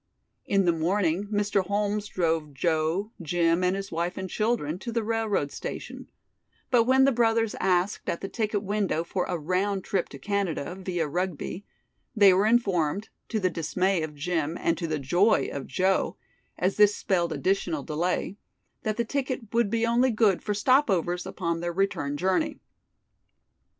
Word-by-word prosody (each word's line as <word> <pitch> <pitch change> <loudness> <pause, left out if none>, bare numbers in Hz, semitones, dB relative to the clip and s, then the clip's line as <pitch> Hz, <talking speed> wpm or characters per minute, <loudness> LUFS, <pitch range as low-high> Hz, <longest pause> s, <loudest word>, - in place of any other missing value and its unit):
In 195 -1 +2
the 175 - +5
morning 175 +3 0
Mr. 205 -1 +1
Holmes 205 +2 -1
drove 160 -6 -1
Joe, 165 +6 0
Jim 170 +1 +1
and 180 +1 +2
his 195 0 -5
wife 170 +2 -2
and 190 0 -3
children 210 -6 -1
to 235 - -5
the 230 -1 -1
railroad 215 -9 0
station, - - -7 0.6
but 235 -3 +5
when 265 +2 +5
the 275 - +4
brothers 225 -2 +2
asked 185 +1 +1
at 170 - -1
the 195 - -3
ticket 210 0 -2
window 200 -5 0
for 180 +2 -2
a 180 - -2
round 185 +4 -1
trip 190 -3 -1
ticket 140 - -11
to - - -16
Canada, 195 -6 -1
via 180 -4 -2
Rugby, 180 +3 -3 0.5
they 200 -3 +7
were 195 +3 +3
informed 200 -5 +1 0.2
to 220 - 0
the 185 -2 +1
dismay 180 +3 0
of 155 -1 -5
Jim 160 +1 -2
and 165 - +1
to 170 - -2
the 155 -1 -1
joy 175 - +2
of 140 - -5
Joe, 190 +6 +1 0.4
as 185 +2 0
this 210 -1 +6
spelled 175 -3 0
additional 175 -5 0
delay 175 +5 -2 0.4
that 215 -1 -2
the 235 - 0
ticket 255 -4 -3
would 230 -3 +2
be 230 +1 +1
only 240 +3 +3
good 215 -5 +2
for 210 - -2
stop 260 +6 +3
overs 180 -1 0
upon 170 -3 -2
their 175 0 -3
return 165 -7 -1
journey. 190 - 0
190 Hz, 170 wpm, -27 LUFS, 170-210 Hz, 0.6 s, they